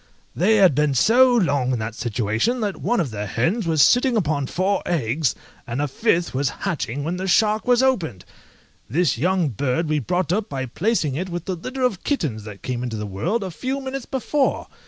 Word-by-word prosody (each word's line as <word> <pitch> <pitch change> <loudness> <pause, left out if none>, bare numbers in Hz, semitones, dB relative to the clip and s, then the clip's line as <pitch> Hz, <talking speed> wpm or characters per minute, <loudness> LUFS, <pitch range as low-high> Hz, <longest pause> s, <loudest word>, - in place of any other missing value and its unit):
They 210 +6 +3
had 190 -6 +5
been 150 0 +1
so 250 - +5
long 140 - +2
in - - 0
that 110 0 -4
situation, 115 - -1
that 205 -3 -2
one 240 +4 +1
of 155 -9 -1
the 105 -1 -4
hens 170 - 0
was 160 -3 +4
sitting 245 -1 +4
upon 150 -8 0
four 190 +7 0
eggs, 145 -3 0 0.3
and 120 +3 -3
a 145 - 0
fifth 170 - 0
was 135 0 0
hatching 140 -3 -3
when 170 +4 -2
the 190 +1 -3
shark 215 +4 +2
was 250 0 +4
opened!!! 170 - 0 0.6
This 145 -2 +1
young 180 0 +1
bird 130 - -1
we 150 0 +1
brought 175 +6 -1
up 210 +2 -1
by 135 -2 -3
placing 160 - 0
it 180 +7 -3
with 175 -1 -5
a 190 - -1
litter 255 +10 -5
of 225 -8 0
kittens 135 - -2
that 105 -2 -10
came 125 -2 -3
into 120 -3 -4
the 105 - -4
world 120 - -2
a 190 - -5
few 260 +10 -3
minutes 270 -1 -5
before! 270 +1 0
170 Hz, 205 wpm, -22 LUFS, 130-215 Hz, 0.6 s, had